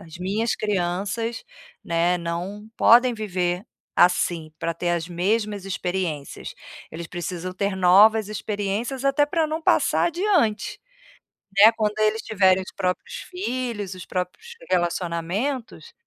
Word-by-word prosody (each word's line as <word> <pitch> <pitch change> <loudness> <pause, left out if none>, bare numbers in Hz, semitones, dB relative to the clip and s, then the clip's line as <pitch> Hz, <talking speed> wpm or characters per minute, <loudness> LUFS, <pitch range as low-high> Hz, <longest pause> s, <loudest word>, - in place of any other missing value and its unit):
as 165 +1 -12
minhas 205 +5 -1
crianças, 205 +4 -2 0.4
né, 170 +1 +1
não 175 +5 -5
podem 245 +1 +6
viver 180 -3 -2 0.4
assim, 170 -3 +2
pra 170 - -1
ter 175 +1 -2
as 170 -1 -1
mesmas 205 +3 -1
experiências. 180 -6 -4 0.4
Eles 165 0 -7
precisam 175 +1 -5
ter 200 +1 -1
novas 200 +4 +5
experiências 215 +5 -3
até 275 +1 +3
pra 320 +2 +1
não 310 +1 -3
passar - - +3
adiante", 340 - 0 0.8
né. 215 +3 +9
Quando 210 -1 0
eles 215 +1 +2
tiverem 190 -3 +3
os - - -11
próprios 195 - -2 0.2
filhos, 245 - -3
os 185 - -9
próprios 195 - -5
relacionamentos, 175 - -2
200 Hz, 125 wpm, -24 LUFS, 180-225 Hz, 0.8 s, né